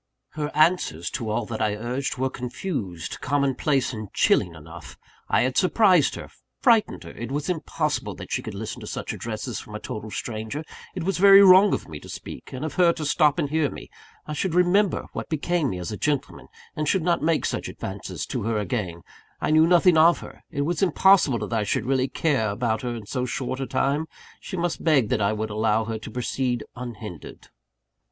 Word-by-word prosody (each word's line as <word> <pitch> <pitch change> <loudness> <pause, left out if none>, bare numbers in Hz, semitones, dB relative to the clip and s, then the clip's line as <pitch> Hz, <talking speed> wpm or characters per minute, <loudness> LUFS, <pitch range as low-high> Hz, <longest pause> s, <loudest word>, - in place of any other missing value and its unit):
Her 150 -1 -4
answers 155 - +2
to 115 - -3
all 105 - -1
that 115 -2 -5
I 105 -1 +1
urged 125 +6 -3
were 130 +1 -1
confused, 120 - -5
commonplace, 140 -1 +1
and 110 -3 -7
chilling 85 -2 +2
enough. 80 -3 -11 0.3
I - - +3
had 130 +1 -1
surprised 185 -4 +4
her - - -7 0.3
frightened 230 -5 +3
her - - -9
it 120 +2 -7
was 145 +4 -2
impossible 155 -2 -2
she - - -2
could - - -7
listen - - -5
to - - -8
such - - -4
addresses - - -5
from - - -10
a - - -4
total - - -6
stranger 110 +6 -4 0.3
it 180 - -3
was 190 0 -1
very 195 +1 +9
wrong 190 +1 +8
of - - -2
me 80 -3 -8
to - - -13
speak, - - -9
and 130 +3 -5
of 155 - -4
her 175 -2 +5
to 155 - -5
stop 150 0 +3
and 150 -5 0
hear 155 -2 +2
me - - -10 0.3
I 150 - -5
should 170 +3 -1
remember 180 +3 +3
what - - -5
became 160 -1 0
me 90 - -4
as 90 +3 -5
a 105 - -4
gentleman, 145 +7 -2 0.3
and 155 0 -2
should 185 +2 +2
not 170 0 +1
make 160 0 +1
such - - -2
advances - - -6
to - - -4
her 110 +1 -1
again 100 -6 -3 0.4
I - - 0
knew 155 +1 +6
nothing 175 -1 +5
of 170 +2 +6
her - - -11
it 140 -3 -3
was 160 +3 -1
impossible 180 -9 +3
I 110 -2 +1
could 105 - -1
really 130 0 +1
care 135 -8 0
about 110 +3 -1
her 120 -2 -3
in 110 -3 -8
so 125 +4 -2
short 130 +1 -3
a 135 - -3
time 145 +4 0 0.3
she 185 - -6
must 175 0 -2
beg 140 -9 +3
that 110 - +1
I 100 0 +2
would 110 0 -3
allow 110 +1 +1
her 110 -1 -4
to 110 - -8
proceed 125 +1 -2
unhindered. 115 -8 -9
135 Hz, 205 wpm, -24 LUFS, 110-165 Hz, 0.4 s, very